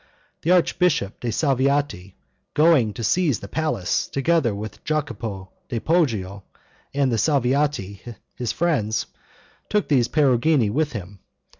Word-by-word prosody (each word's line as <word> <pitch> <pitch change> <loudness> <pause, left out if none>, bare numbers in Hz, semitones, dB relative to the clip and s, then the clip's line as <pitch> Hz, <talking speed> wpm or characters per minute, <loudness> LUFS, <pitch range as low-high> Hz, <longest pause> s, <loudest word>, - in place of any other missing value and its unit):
The 165 - -2
Archbishop 175 - +2
de' 120 - -2
Salviati, 135 - 0 0.4
going 150 -8 +4
to 115 - -6
seize 155 - +2
the 100 - -8
palace, 155 - -1
together 140 -5 +1
with 105 +1 -8
Jacopo 115 -10 -3 0.2
di 120 -4 -2
Poggio, 110 - 0 0.5
and 140 -2 +1
the 115 - +1
Salviati, 135 -7 0 0.3
his 120 -2 -3
friends, 135 -11 0 0.6
took 210 -1 0
these 130 -5 +3
Perugini 135 -4 +2
with 150 +4 0
him. 100 -2 -7
130 Hz, 125 wpm, -23 LUFS, 105-155 Hz, 0.6 s, going